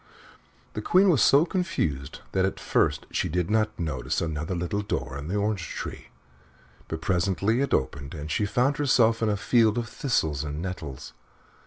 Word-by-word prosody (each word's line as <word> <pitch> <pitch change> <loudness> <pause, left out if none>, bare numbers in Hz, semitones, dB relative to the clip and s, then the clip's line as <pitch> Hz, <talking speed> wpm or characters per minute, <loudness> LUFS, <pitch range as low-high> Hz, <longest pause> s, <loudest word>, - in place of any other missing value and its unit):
The 105 - -4
Queen 185 - +4
was 150 - +3
so 145 +4 +6
confused 85 - -2
that 95 - +1
at 95 - -1
first - - +1
she - - -1
did 90 +3 -1
not 110 0 +1
notice 75 -7 -2
another 80 +2 -2
little 90 +4 -2
door 65 -10 -3
in 70 +1 -6
the 95 - -2
orange 105 -3 -1
tree, - - -6 0.8
but 80 0 -5
presently 100 +5 +1
it 140 - -1
opened 70 +2 -1
and 75 0 -6
she 105 - +1
found 125 +8 +1
herself 115 -5 +3
in 110 - +2
a 105 - +1
field 110 +1 +3
of 120 -1 -1
thistles 80 - -1
and 75 0 -4
nettles. 80 -7 -6
95 Hz, 175 wpm, -26 LUFS, 80-115 Hz, 0.8 s, so